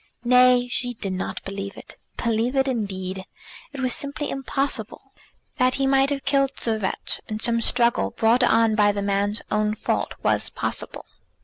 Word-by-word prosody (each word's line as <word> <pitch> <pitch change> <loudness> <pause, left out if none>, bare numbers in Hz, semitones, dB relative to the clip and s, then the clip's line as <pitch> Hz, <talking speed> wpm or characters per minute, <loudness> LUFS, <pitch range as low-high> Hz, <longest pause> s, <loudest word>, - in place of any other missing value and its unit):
Nay, 250 0 +5
she 245 -1 -2
did 200 -4 -4
not 185 - -4
believe 195 0 -6
it. - - -12 0.2
Believe 235 +2 0
it, 270 0 +2
indeed! 190 -6 -3 0.5
It 275 - -6
was 255 -1 +1
simply 285 +1 -3
impossible. 270 +1 -3 0.4
That 255 0 +3
he 275 - 0
might 270 0 +3
have 280 -1 -3
killed 275 -1 +2
the 220 -2 0
wretch 190 -2 0
in 215 0 -3
some 230 0 +1
struggle 235 - +2
brought 230 - +2
on 225 -2 +4
by 205 -1 +3
the 200 0 -3
man's 200 +2 0
own 210 0 +1
fault - - -2
was - - +2
possible. - - -3
235 Hz, 170 wpm, -23 LUFS, 205-255 Hz, 0.5 s, Nay